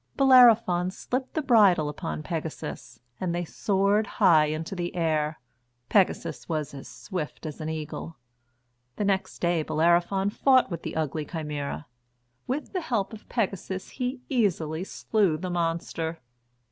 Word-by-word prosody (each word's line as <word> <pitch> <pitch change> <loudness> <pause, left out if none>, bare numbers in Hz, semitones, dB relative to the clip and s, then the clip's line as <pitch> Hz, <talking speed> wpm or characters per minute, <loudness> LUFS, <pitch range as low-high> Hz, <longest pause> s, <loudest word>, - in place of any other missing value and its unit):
Bellerophon 230 -9 +6
slipped 255 +7 -4
the 315 - 0
bridle 205 - +5
upon 80 - -4
Pegasus - - -6 0.2
and 175 -2 -1
they 175 0 -2
soared 200 +4 +1
high 170 -7 +6
into 160 +5 -4
the 175 0 -4
air. 155 -3 0 0.5
Pegasus 195 -3 +1
was 155 -3 -2
as 135 -1 -9
swift 180 -5 -6
as 155 0 -6
an 155 - -3
eagle. 160 +1 -6 0.8
The 205 - -1
next 195 -1 0
day 170 -2 +1
Bellerophon 175 +5 +2
fought 260 -2 +3
with 170 -1 -4
the - - -6
ugly 155 -1 -2
Chimæra. 150 - -4 0.6
With 280 +9 -3
the 370 - -1
help 225 - -1
of 215 - -12
Pegasus 195 -4 -2
he 250 0 -4
easily 180 - 0
slew 195 -4 0
the 185 +2 -4
monster. 165 -1 -2
175 Hz, 140 wpm, -27 LUFS, 160-210 Hz, 0.8 s, Bellerophon